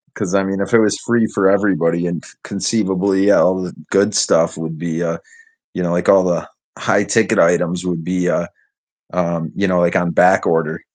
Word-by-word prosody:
'Cause, 90 - -4
I 95 -1 +2
mean, 95 0 -3
if 100 - -4
it 115 - +6
was 105 -2 +2
free 115 -2 +1
for 95 -1 +1
everybody 90 -4 +1
and 85 -3 -4 0.2
conceivably, 100 -1 0
eh, - - +5
all 95 0 +2
the 90 - -7 0.2
good 100 +1 +2
stuff - - +2
would 80 0 -6
be, 85 +1 -3
uh, 85 -1 -2 0.6
you 90 - -4
know, 85 -1 -1
like, 90 +1 -1
all 95 -1 +5
the 90 -2 -1 0.3
high - - +1
ticket - - +1
items 90 +1 +1
would 85 -3 -3
be, 90 0 -1
uh 85 - -1 0.7
um, 85 -3 -2
you 100 - 0
know, 90 -1 +1
like, 85 0 +1
on 90 0 +1
back 95 +3 +3
order. 80 0 -1
90 Hz, 205 wpm, -17 LUFS, 85-95 Hz, 0.7 s, it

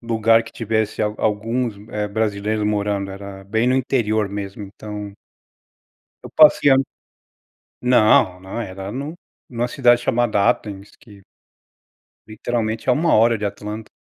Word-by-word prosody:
lugar 115 -1 +3
que 115 - -11
tivesse 110 -1 -2
a 105 - +2
alguns 110 +2 -1 0.4
brasileiros 105 0 -1
morando, 100 -1 -1
era 100 0 -9
bem 110 +4 0
no 130 - +2
interior 110 -5 0
mesmo, 100 0 -6
então 105 0 -8 1.1
Eu - - -9
passei 150 -2 +6 1.1
Não, 110 -7 +4
não 95 +5 -7
era 95 -1 -7
no 140 +7 -5 0.3
numa 120 0 -2
cidade 120 -2 +3
chamada 120 -4 +2
Athens 105 -4 -4
que 100 -4 -17 1.0
Literalmente 110 +1 -3
a 125 - +6
uma 165 +3 +1
hora 115 +1 +4
de 105 - -4
Atlanta. 105 +2 -6
110 Hz, 130 wpm, -21 LUFS, 100-120 Hz, 1.1 s, passei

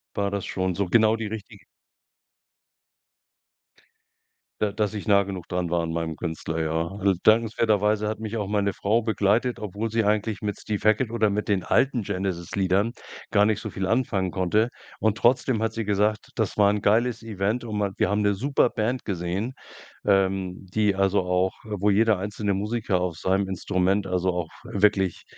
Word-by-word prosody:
war 100 0 0
das 100 -1 -3
schon 95 -1 -2
so 100 0 -1
genau 110 +3 +4
die 115 -1 -4
richtige 105 -1 -8 3.0
Da 105 -1 +1
dass 105 +1 -1
ich 105 0 -6
nah 100 -1 +5
genug 95 -3 -7
dran 90 -1 -2
war 85 -1 +2
an 85 0 -3
meinem 80 -1 -2
Künstler, 80 -1 -4
ja. 80 +1 -1
Al 100 -1 +2
dankenswerterweise 110 -1 +3
hat 110 +1 -3
mich 110 +1 -4
auch 105 -3 -2
meine 100 -1 0
Frau 110 +5 +1
begleitet, 110 +2 +1
obwohl 105 +2 -4
sie 115 +1 +1
eigentlich 105 0 0
mit 105 -2 -3
Steve 105 -1 -2
Hackett 110 +3 +3
oder 110 -2 +1
mit 105 +1 -2
den 100 -3 +1
alten 130 -4 +2
Genesis-Liedern 95 +2 -1 0.4
gar 105 -2 +5
nicht 110 -2 +1
so - - -6
viel 95 -1 -3
anfangen 100 -5 0
konnte. 95 +6 +1 0.3
Und 110 -1 +1
trotzdem 120 0 +2
hat 115 0 -1
sie 115 - -2
gesagt, 105 +1 0
das 110 -4 -1
war 100 -1 +5
'n 105 0 0
geiles 115 +3 +2
Event 110 +2 -2
und 110 -3 -5
man 100 -2 -1
wir - - +2
haben 105 +1 +1
'ne 100 -1 +2
super 135 +3 +2
Band 120 +4 -2
gesehen, 95 +5 -3 0.5
ähm, 95 -2 +1
die 105 -2 +2
also 95 +1 +2
auch 90 +1 +1
wo 105 -1 -1
jeder 110 0 +3
einzelne 105 +1 -2
Musiker 105 -1 -1
auf 90 -3 -2
seinem 95 +3 0
Instrument 95 +1 0
also 90 0 0
auch 90 -2 -3
wirklich 100 -3 +1
100 Hz, 175 wpm, -25 LUFS, 95-110 Hz, 3.0 s, nah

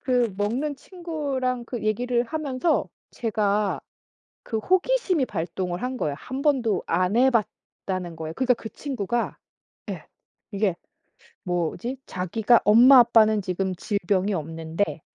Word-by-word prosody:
그 245 -5 +1
먹는 255 +8 -1
친구랑 280 -8 -3
그 240 -3 -5
얘기를 240 +3 +1
하면서 300 +3 -1 0.2
제가 210 -2 0 0.6
그 225 - -3
호기심이 370 - +2
발동을 175 -1 -3
한 255 0 -2
거예요 145 -8 -1
1 265 +2 -6
번도 245 - +2
안 185 +5 +1
해봤다는 195 -7 -1
거에. 160 0 -5
그러니까 255 +3 +2
그 220 - -8
친구가 240 -4 -3 0.5
예 - - -7 0.5
이게 195 -3 0 0.7
뭐지 175 +8 -2
"자기가 215 +6 +2
엄마 245 +5 +8
아빠는 220 -3 +5
지금 185 0 -2
질병이 200 0 0
없는데 165 +3 -3
220 Hz, 260 characters per minute, -25 LUFS, 185-255 Hz, 0.7 s, 엄마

